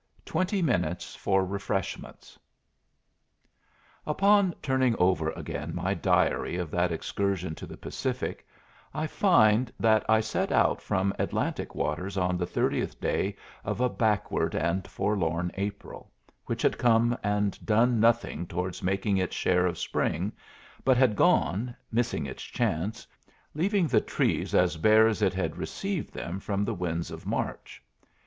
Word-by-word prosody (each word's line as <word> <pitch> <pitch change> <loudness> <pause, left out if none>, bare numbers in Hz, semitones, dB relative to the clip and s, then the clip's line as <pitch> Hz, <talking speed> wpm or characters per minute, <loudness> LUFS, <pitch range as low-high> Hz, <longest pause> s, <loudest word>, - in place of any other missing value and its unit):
Twenty 185 +3 0
Minutes 90 - -1
for 95 -1 +1
Refreshments 95 -1 -4 1.7
Upon 195 +3 +3
turning 130 -3 +2
over 90 -3 +2
again - - -5
my - - 0
diary - - +1
of 85 -4 -4
that 85 0 +1
excursion 95 0 -2
to - - -8
the - - -10
Pacific, - - -4 0.5
I 155 - -1
find 125 - +3
that 110 -1 +4
I 110 0 +5
set 110 0 -1
out - - +3
from 95 0 0
Atlantic - - -2
waters 95 +2 -2
on 90 -1 +1
the 90 0 -2
30th - - -1
day - - -1 0.3
of - - -3
a 125 0 +2
backward 110 -4 0
and 85 +4 -1
forlorn 90 -4 -1
April, 100 +1 -6 0.4
which - - -3
had - - +2
come 120 0 +4
and 105 -1 0
done 115 +2 +3
nothing 115 -7 +2
towards 90 0 -4
making 95 +2 0
its 95 -1 -1
share 90 0 +2
of 90 -1 -3
spring, 90 +7 -1 0.5
but 130 -2 +4
had 125 -5 +4
gone, 110 - +2 0.2
missing 115 -8 0
its 65 - -7
chance, 105 +9 -2 0.5
leaving 190 +4 +1
the 115 -8 +3
trees - - 0
as 90 -2 +3
bare 110 +6 +6
as 110 -1 -1
it 95 -3 +2
had 85 -4 -2
received 195 -4 -4
them 85 +3 -5
from 100 0 -1
the 115 - -1
winds 85 -3 -3
of - - -9
March. - - -4
100 Hz, 145 wpm, -28 LUFS, 90-120 Hz, 1.7 s, bare